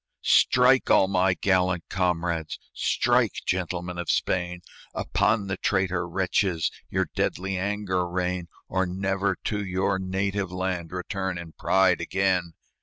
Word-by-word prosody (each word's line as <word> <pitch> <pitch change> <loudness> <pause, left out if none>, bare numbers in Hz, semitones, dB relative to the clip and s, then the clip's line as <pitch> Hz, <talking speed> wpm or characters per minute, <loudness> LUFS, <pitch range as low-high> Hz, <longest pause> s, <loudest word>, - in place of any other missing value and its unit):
"Strike! 125 +1 +4
all 95 - +5
my 95 -1 +2
gallant 90 -2 +1
comrades! 85 -3 -1 0.2
Strike! - - +2
gentlemen 90 -1 -2
of 85 - -4
Spain! 90 -1 0 0.3
Upon 105 -1 +1
the 95 -1 -3
traitor 95 -3 0
wretches 90 -2 0 0.2
Your 95 0 0
deadly 95 +2 -1
anger 95 -2 -1
rain, 90 -1 -2 0.2
Or 95 -1 0
never 95 +1 -1
to 105 -1 -2
your 95 0 0
native 95 0 -2
land 90 -2 -3
Return 95 0 -3
in 85 -2 -8
pride 95 +1 +2
again!" 95 -3 0
95 Hz, 125 wpm, -26 LUFS, 90-95 Hz, 0.3 s, all